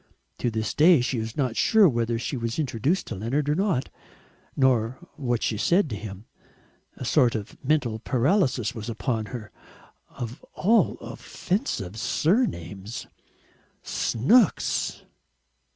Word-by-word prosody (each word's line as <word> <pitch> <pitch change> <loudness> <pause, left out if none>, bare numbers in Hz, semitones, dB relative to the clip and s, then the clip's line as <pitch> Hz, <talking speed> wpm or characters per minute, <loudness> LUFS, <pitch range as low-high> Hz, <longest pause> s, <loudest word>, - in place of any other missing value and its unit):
To 120 - 0
this 110 -1 -2
day 165 +1 +6
she 125 0 -1
is 110 0 -5
not 130 -5 0
sure 220 -3 +5
whether 115 -4 0
she 120 +4 -3
was 115 -2 -3
introduced 145 - 0
to - - -5
Leonard 125 +9 -1
or 150 - +3
not, 185 -6 0 0.7
nor 125 -3 +2 0.2
what 120 -5 -1
she 110 - 0
said 170 - +2
to - - -2
him. 100 0 -8 0.7
A 130 - -6
sort 125 -2 +3
of 105 -2 -5
mental 130 -6 +1
paralysis 130 - +1
was 110 -1 -6
upon 115 -1 -2
her. 110 -4 -7 0.6
Of 120 +2 -7
all 225 +4 +3
offensive 115 - -3
surnames 110 - -1 0.8
Snooks! 175 - +2
120 Hz, 130 wpm, -25 LUFS, 110-155 Hz, 0.8 s, day